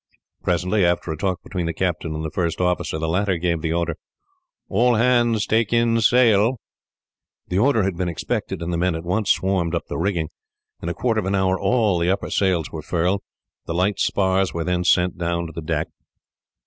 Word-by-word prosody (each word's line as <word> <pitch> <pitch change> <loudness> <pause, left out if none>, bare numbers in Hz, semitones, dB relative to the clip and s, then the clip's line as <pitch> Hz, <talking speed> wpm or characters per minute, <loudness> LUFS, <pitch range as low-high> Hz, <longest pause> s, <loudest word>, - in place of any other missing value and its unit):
Presently, 90 +3 +1
after 85 -1 +1
a - - -2
talk 90 +3 -2
between 90 -4 -3
the 85 - -3
captain 85 -3 -2
and 80 +1 -4
the 80 - -4
first 85 -1 -1
officer, 90 -3 0
the 80 +1 -2
latter 95 +2 +1
gave 85 -1 -1
the 80 0 -1
order, 85 -2 -1 0.7
"All 120 +4 +3
hands 120 -2 +3
take 110 -1 +1
in 115 -1 +3
sail." 115 0 +4 0.9
The 90 - +1
order 115 -2 +3
had 95 -2 -1
been 90 -1 -1
expected, 85 +2 -3
and 85 +1 -3
the 85 - -1
men 90 -1 +1
at 80 - -5
once 100 +4 -1
swarmed 95 -3 +1
up - - -3
the - - -3
rigging. 85 -4 -1 0.5
In 85 - -3
a 85 - -3
quarter 115 +2 0
of 95 - -3
an 100 - +1
hour 95 -1 +1
all 110 -8 +2
the 85 +1 +1
upper 95 - -1
sails 90 -5 +1
were 80 - -5
furled. 90 +5 0 0.5
The 85 - -3
light 95 +3 +1
spars 95 -3 +1
were 85 - -1
then 90 +1 0
sent 90 0 +2
down 85 0 -1
to 80 - -8
the 85 - -5
deck. 75 - -2
90 Hz, 205 wpm, -22 LUFS, 85-100 Hz, 0.9 s, sail